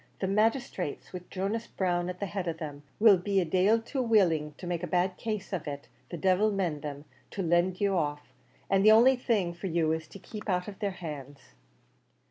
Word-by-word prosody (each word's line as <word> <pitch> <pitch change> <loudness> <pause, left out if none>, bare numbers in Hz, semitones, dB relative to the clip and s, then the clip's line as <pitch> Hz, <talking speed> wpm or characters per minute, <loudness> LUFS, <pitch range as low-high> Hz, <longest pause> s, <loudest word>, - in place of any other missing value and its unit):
The - - -2
magisthrates, 210 - -1
with 180 -1 -8
Jonas 200 +5 -2
Brown 175 -2 -1
at 180 0 -6
the 200 - -1
head 190 -2 -4
of 165 -1 -2
them, 145 -3 -7 0.2
will 205 -4 +7
be 195 +2 +1
a 180 - +1
dail 190 +7 +3
too 260 +4 -3
willing 170 -11 +2
to - - -9
make 175 -1 -2
a 180 - -3
bad 180 +2 +1
case 215 -1 -4
of 175 -5 -3
it, 140 -1 -6 0.2
the 175 - -5
divil 190 +4 +3
mend 175 -7 -1
them, 145 0 -6 0.2
to 195 - -4
let 175 +2 +2
you 200 -1 +2
off; 145 -3 -2 0.3
an' 195 0 +3
the 215 +2 +7
only 240 +5 +7
thing 215 -8 0
for 175 +3 -6
you 165 -2 +1
is, 160 0 -2
to - - -11
keep 210 +2 -8
out 180 -1 0
of 200 -1 -8
their 205 -2 0
hands." 145 - -9
185 Hz, 215 wpm, -29 LUFS, 165-205 Hz, 0.3 s, will